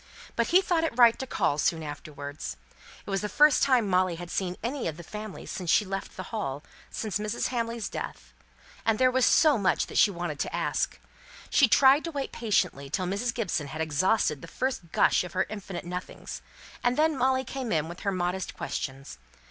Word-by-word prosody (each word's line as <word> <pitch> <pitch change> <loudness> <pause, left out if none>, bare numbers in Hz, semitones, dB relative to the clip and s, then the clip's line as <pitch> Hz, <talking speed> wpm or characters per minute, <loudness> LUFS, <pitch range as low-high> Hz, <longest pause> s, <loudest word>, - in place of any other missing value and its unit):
But - - +1
he 370 +3 +5
thought 340 -3 +1
it 320 -7 -2
right 235 -2 +6
to 265 - -4
call 155 -10 0
soon 160 +1 +1
afterwards. 145 -1 -7 0.5
It - - -6
was 195 - 0
the 210 - -3
first 300 +4 +5
time 255 -6 +3
Molly 185 -2 +2
had 175 +1 -8
seen 185 -2 -2
any 255 +3 -2
of 160 -2 -4
the 170 - -9
family 210 +3 -7
since 180 -3 -5
she 210 - +4
left 195 0 -5
the 185 - -4
Hall, 150 -10 -3 0.3
just - - -4 0.2
before - - -3
Mrs. 220 - -1
Hamley's 230 -2 -2
death; - - -7 0.5
and 225 -1 +2
there 255 +1 +4
was 260 0 +3
so 300 -7 +5
much 195 - +2
that - - -1
she - - +6
wanted 175 -5 -4
to - - -2
ask. - - -1 0.5
She 280 - +6
tried 270 +5 +6
to 335 - -4
wait 280 -3 -3
patiently 180 - 0
till 185 +6 -1
Mrs. 200 +7 -1
Gibson 190 -11 -2
had 155 - -7
exhausted 160 0 +1
the - - -9
first 255 -11 -3
gush - - +3
of 180 -2 -8
her 185 - +1
infinite 195 -5 -6
nothings; 180 +1 -6 0.4
and 245 +1 +2
then 310 0 +3
Molly 260 0 +2
came 260 -2 -5
in 155 -1 +1
with 175 +2 -8
her 200 - -1
modest 180 0 -2
questions. 135 - -5
200 Hz, 205 wpm, -28 LUFS, 170-250 Hz, 0.5 s, right